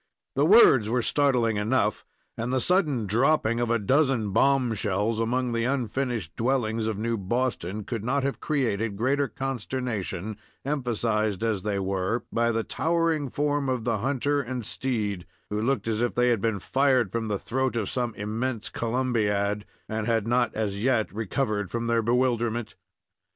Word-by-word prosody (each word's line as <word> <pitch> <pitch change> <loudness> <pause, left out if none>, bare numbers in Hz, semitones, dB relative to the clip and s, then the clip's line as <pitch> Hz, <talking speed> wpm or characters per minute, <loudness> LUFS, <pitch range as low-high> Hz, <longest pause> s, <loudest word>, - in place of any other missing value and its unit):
The 140 +3 +3
words 150 - +7
were 120 +1 +1
startling 125 -7 +2
enough, 105 0 +1 0.3
and 115 +2 -3
the 130 - +2
sudden 150 - +1
dropping 115 +2 +2
of 120 -1 0
a 120 - +3
dozen 130 -1 +2
bombshells 115 -4 +1
among 125 +2 0
the 115 0 0
unfinished 125 - -2
dwellings 115 -3 0
of 110 -3 -2
New 115 +2 -1
Boston 105 -2 -2
could 115 0 -4
not 135 +4 0
have 140 0 -2
created 115 -8 -1
greater 135 +5 +1
consternation, 120 -7 -4 0.3
emphasized 115 -7 -1
as 110 -4 0
they 105 0 -1
were 95 +3 -1
by 115 0 +2
the 115 0 0
towering 165 -2 0
form 145 0 0
of 125 -3 -1
the 115 -2 0
hunter 140 +4 0
and 125 -3 -5
steed, 105 -7 -2 0.2
who 105 +1 -1
looked 115 -2 0
as 110 0 0
if 120 - 0
they 125 0 +3
had 115 -4 +1
been 110 -2 0
fired 130 -3 +2
from 115 0 -2
the 105 -1 -1
throat 130 +4 -1
of 110 -4 -1
some 120 -3 -2
immense 110 +3 -3
Columbiad, 105 -4 0 0.2
and 110 0 -3
had 115 -3 +1
not 120 +1 +2
as 105 -2 -2
yet 120 -7 +1
recovered 105 -2 -1
from 115 +2 -3
their 115 0 +2
bewilderment. 120 -1 0
115 Hz, 160 wpm, -26 LUFS, 105-130 Hz, 0.3 s, words